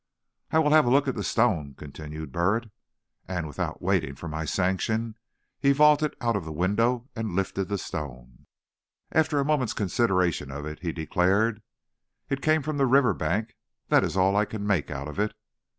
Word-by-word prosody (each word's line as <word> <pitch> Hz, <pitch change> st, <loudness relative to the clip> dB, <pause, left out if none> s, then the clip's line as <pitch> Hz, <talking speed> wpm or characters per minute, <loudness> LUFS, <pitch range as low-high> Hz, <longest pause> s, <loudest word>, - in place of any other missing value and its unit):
"I -, -, +1 dB
will 150 Hz, -2 st, +3 dB
have 155 Hz, -4 st, +6 dB
a -, -, +4 dB
look 140 Hz, +2 st, +3 dB
at 130 Hz, -, +1 dB
that 105 Hz, -, -4 dB
stone," 85 Hz, -, +1 dB
continued 75 Hz, +1 st, -8 dB
Burritt; 105 Hz, -, 0 dB, 0.6 s
and 90 Hz, -3 st, -3 dB
without 75 Hz, -3 st, -4 dB
waiting 70 Hz, -, 0 dB
for 85 Hz, -, -8 dB
my 80 Hz, +1 st, -4 dB
sanction, 105 Hz, +6 st, 0 dB, 0.5 s
he 140 Hz, 0 st, +4 dB
vaulted 150 Hz, +1 st, +4 dB
out 115 Hz, -2 st, 0 dB
of 100 Hz, -, -1 dB
the 80 Hz, -, -7 dB
window 115 Hz, -, +1 dB
and 110 Hz, -6 st, -3 dB
lifted 95 Hz, 0 st, -1 dB
the 100 Hz, +2 st, -2 dB
stone. 60 Hz, -8 st, -7 dB, 0.6 s
After 160 Hz, -1 st, +2 dB
a 140 Hz, -, +1 dB
moment's 135 Hz, -6 st, +1 dB
consideration 90 Hz, -, +1 dB
of 70 Hz, +2 st, -6 dB
it 75 Hz, 0 st, -6 dB
he 85 Hz, -2 st, -3 dB
declared: 95 Hz, +7 st, +1 dB, 0.7 s
"It 135 Hz, 0 st, -2 dB
came 155 Hz, 0 st, +2 dB
from 155 Hz, +1 st, -3 dB
the 135 Hz, -1 st, +3 dB
river 130 Hz, 0 st, +4 dB
bank; 105 Hz, +9 st, -2 dB, 0.4 s
that -, -, +5 dB
is -, -, -2 dB
all 95 Hz, +1 st, +3 dB
I 105 Hz, +1 st, +3 dB
can 105 Hz, -1 st, -5 dB
make 95 Hz, -7 st, +1 dB
out 70 Hz, -1 st, -5 dB
of 75 Hz, +6 st, -7 dB
it." 105 Hz, +1 st, 0 dB
100 Hz, 185 wpm, -26 LUFS, 80-125 Hz, 0.7 s, have